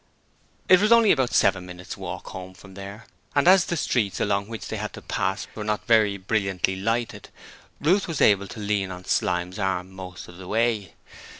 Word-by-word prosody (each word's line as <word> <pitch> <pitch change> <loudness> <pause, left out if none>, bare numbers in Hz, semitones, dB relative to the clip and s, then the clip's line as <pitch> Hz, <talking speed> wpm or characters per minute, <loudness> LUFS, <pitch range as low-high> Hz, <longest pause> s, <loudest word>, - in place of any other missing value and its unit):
It 185 +1 +7
was 210 +2 +2
only 230 -3 +7
about 130 -4 +2
seven 95 -2 +3
minutes' 90 0 -8
walk - - -7
home 95 0 -8
from 95 +1 -14
there, 100 +3 -9 0.3
and 140 +3 +3
as 185 0 +7
the 170 - -2
streets 110 -9 0
along 100 -1 0
which 115 -1 -7
they - - -4
had - - -5
to - - -9
pass 95 0 -2
were 105 - -6
not 105 0 -2
very 110 -4 +4
brilliantly 95 -2 -1
lighted, 115 +5 -2 0.5
Ruth 185 +7 +2
was 165 -4 -3
able 100 -1 +4
to 95 +4 -9
lean 100 -2 -1
on 90 0 -8
Slyme's 90 +3 -1
arm 95 -2 -1
most 95 -1 -9
of 85 - -13
the 95 -1 -10
way. 110 -1 0
100 Hz, 195 wpm, -25 LUFS, 95-115 Hz, 0.5 s, It